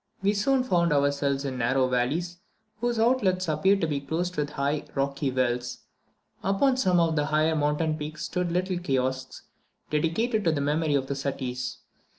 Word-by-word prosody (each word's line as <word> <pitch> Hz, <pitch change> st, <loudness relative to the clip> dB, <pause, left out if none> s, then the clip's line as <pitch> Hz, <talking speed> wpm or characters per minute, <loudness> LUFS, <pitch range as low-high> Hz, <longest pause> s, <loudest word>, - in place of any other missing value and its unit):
We 200 Hz, +1 st, +3 dB
soon 255 Hz, +6 st, +2 dB
found 170 Hz, -8 st, +2 dB
ourselves 140 Hz, -1 st, +1 dB
in 130 Hz, -2 st, -3 dB
narrow 130 Hz, +2 st, +2 dB
valleys, 150 Hz, +8 st, -1 dB, 0.4 s
whose 240 Hz, 0 st, 0 dB
outlets 215 Hz, -6 st, +2 dB
appeared 190 Hz, +6 st, +2 dB
to 165 Hz, -, +1 dB
be 145 Hz, -2 st, -2 dB
closed 170 Hz, +6 st, -2 dB
with 150 Hz, -1 st, -1 dB
high, 145 Hz, +1 st, -1 dB
rocky 140 Hz, 0 st, 0 dB
wells. 125 Hz, -1 st, -1 dB, 0.6 s
Upon 225 Hz, +8 st, +2 dB
some 185 Hz, -9 st, +3 dB
of 165 Hz, -1 st, +2 dB
the 150 Hz, -1 st, +1 dB
higher 155 Hz, +1 st, +2 dB
mountain 150 Hz, +1 st, +1 dB
peaks 155 Hz, +1 st, -5 dB
stood 180 Hz, -1 st, -2 dB
little 180 Hz, +1 st, 0 dB
kiosks, 130 Hz, -5 st, -2 dB, 0.5 s
dedicated 210 Hz, +9 st, +1 dB
to 165 Hz, -, +4 dB
the 145 Hz, -, -1 dB
memory 150 Hz, +1 st, +1 dB
of 135 Hz, -2 st, +1 dB
the 140 Hz, -, -3 dB
Suttis. 130 Hz, -2 st, -4 dB
155 Hz, 165 wpm, -27 LUFS, 140-180 Hz, 0.6 s, to